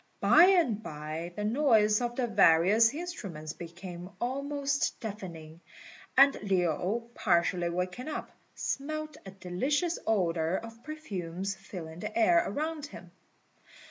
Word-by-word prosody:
By 345 - +7
and 335 - +3
by 155 0 -6
the 210 - -3
noise 220 -3 +3
of 240 0 -2
the 255 - 0
various 210 +1 +5
instruments 205 - -6
became 175 +1 -9
almost 280 +3 -1
deafening, 170 -7 -8 0.6
and 275 +1 +8
Lin, 190 +3 0
partially 175 -1 +1
waking 180 - -3
up, 310 - -5 0.2
smelt 310 +1 -3
a - - -5
delicious 260 - -1
odour 175 -5 +1
of 230 +3 -7
perfumes 195 - -5
filling 165 -4 -9
the 215 +3 -5
air 340 +10 +5
around 305 0 -3
him. - - -12
210 Hz, 120 wpm, -30 LUFS, 175-280 Hz, 0.6 s, and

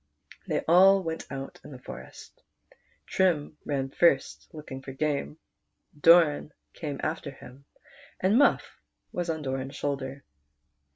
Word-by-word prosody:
.They - - 0
all 190 +3 +6
went 165 -1 -5
out 135 0 -7
in - - -11
the 135 - -9
forest. 125 - -11 0.6
Trim 160 -5 0
ran 135 -2 -2
first 140 -5 +2
looking 150 -4 -8
for 135 0 -8
game, 150 +1 -2 0.6
Doran 155 -1 +5 0.2
came 145 -4 -5
after 155 -2 -2
him, 135 0 -14 0.5
and 190 +3 +2
Muff 285 +3 +2 0.3
was 175 -1 -3
on 160 -2 -2
Doran's 135 +1 -4
shoulder. 140 -1 -4
150 Hz, 125 wpm, -28 LUFS, 135-165 Hz, 0.6 s, all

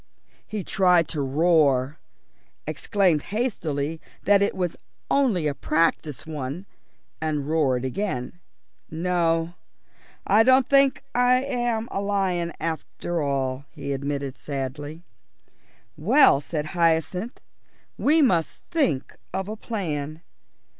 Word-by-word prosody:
He 210 -3 -4
tried 180 -4 +3
to 150 - -2
roar, 140 -1 +2 0.7
exclaimed 185 -7 +1
hastily 165 - -2 0.2
that 200 0 +4
it 200 - +1
was 180 -3 -2 0.4
only 235 - +2
a 150 - +1
practice 155 -1 0
one, 150 +3 -5 0.6
and 150 -3 -1
roared 135 -5 +1
again. 130 -1 -3 0.5
"No, 165 0 0 0.7
I 210 +2 +5
don't 260 +2 +5
think 275 -1 +4
I'm 245 -2 +1
a 195 - -2
lion 190 -4 0
after 165 +1 -3
all," 135 -1 -1
he 140 -2 -5
admitted 140 -1 -3
sadly. 145 +3 -5 0.9
"Well," 225 - +5
said 150 0 -3
Hyacinth, 170 - 0 0.6
"we 310 +2 +3
must 170 - +1
think 225 - 0 0.2
of 190 0 -2
a 215 - -4
plan." 160 -8 -4
165 Hz, 105 wpm, -25 LUFS, 145-200 Hz, 0.9 s, I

